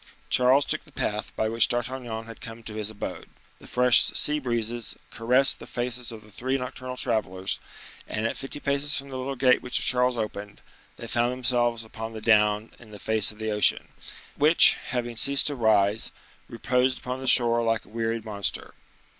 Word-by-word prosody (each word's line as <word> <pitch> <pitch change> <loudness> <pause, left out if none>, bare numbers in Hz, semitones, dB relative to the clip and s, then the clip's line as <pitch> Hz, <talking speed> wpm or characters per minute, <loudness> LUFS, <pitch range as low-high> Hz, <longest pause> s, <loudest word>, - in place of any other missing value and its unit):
Charles 130 +3 +4
took - - -2
the - - -18
path - - -3
by 110 - -1
which 115 +1 +3
D'Artagnan 120 -2 -4
had 115 0 -12
come 115 -1 -10
to 110 - -7
his 105 -1 -3
abode; 110 -2 -7 0.3
the - - -15
fresh 125 -1 +5
sea 150 0 0
breezes 120 -3 -2
soon - - -4
caressed 125 +4 +3
the - - -11
faces 120 0 -3
of 110 -2 -11
the 105 - -18
three 130 +6 -2
nocturnal 125 0 -7
travelers, 95 -7 -1 0.5
and, 110 +1 -3
at 115 - -1
fifty 135 +2 -7
paces 140 +1 +2
from 140 0 -6
the 130 - -5
little 135 +2 -4
gate 130 0 +3
which 125 - -1
Charles 125 -1 +1
opened, 105 -2 -6 0.4
they - - -8
found 120 +1 0
themselves 120 -2 0
upon 110 0 -8
the 110 - -7
down 105 0 +2
in 115 - -16
the 105 - -11
face 110 0 +1
of 105 - -17
the 110 0 -3
ocean, 105 0 +3 0.5
which, 155 +3 +6
having 120 -1 -3
ceased 140 +5 +5
to 145 - 0
rise, 110 -3 +2 0.4
reposed 125 +2 0
upon 125 +1 -6
the 130 - -6
shore 120 -1 +4
like 115 -1 -1
a - - -20
wearied 115 0 -3
monster. 100 -2 -3
120 Hz, 190 wpm, -25 LUFS, 110-125 Hz, 0.5 s, which